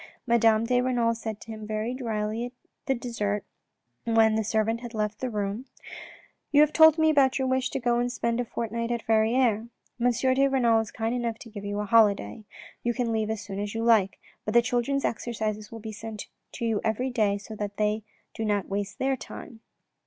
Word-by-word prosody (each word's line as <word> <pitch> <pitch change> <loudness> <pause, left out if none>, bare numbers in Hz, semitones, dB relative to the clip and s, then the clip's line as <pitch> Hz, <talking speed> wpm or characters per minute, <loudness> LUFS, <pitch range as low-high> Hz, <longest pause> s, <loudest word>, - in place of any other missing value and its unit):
Madame 230 -2 +4
de 245 +1 +2
Renal 245 -2 +1
said 220 -2 -5
to 225 - -10
him 215 -1 -7
very 215 +3 -2
drily 225 -1 -3 0.4
at 265 -3 +1
dessert 210 -4 -2 0.6
when 225 -1 +4
the 220 0 +1
servant 220 +2 0
had 240 -1 -8
left 210 0 -2
the 255 - -2
room: 210 +3 -3 0.4
" - - -23
You 290 0 +6
have 305 0 +4
told 315 -1 +7
me 315 0 +4
about 270 -3 +4
your 265 -1 0
wish 260 0 +1
to - - -3
go 240 -1 +1
and 245 0 0
spend 235 -1 -1
a - - -3
fortnight 230 0 -3
at 235 -1 -2
Verrieres. 225 0 +2 0.3
M. 245 +1 +3 0.2
de 275 +1 +3
Renal 240 -4 +3
is 225 -1 -3
kind 225 +1 -2
enough 235 -2 -2
to 230 - -12
give 205 -2 -8
you 205 0 -3
a - - -3
holiday. 210 - +3 0.4
You 240 0 -1
can 245 -3 0
leave 220 -1 0
as 220 -1 -2
soon 195 -1 -6
as 205 +1 -4
you 225 - -1
like, 220 -5 +3 0.3
but 215 - -3
the 235 - +7
childrens' 250 +3 0
exercises 215 -2 -3
will 225 - -7
be 220 0 -7
sent 215 0 -7 0.3
to 235 - -4
you 225 -2 0
every 235 +4 0
day 210 -4 +1
so 210 +2 -9
that 205 -1 -4
they 215 +1 +1 0.3
do 225 - -4
not 205 -3 0
waste 200 0 -3
their 265 0 +1
time." 240 -2 -10
225 Hz, 210 wpm, -27 LUFS, 215-245 Hz, 0.6 s, told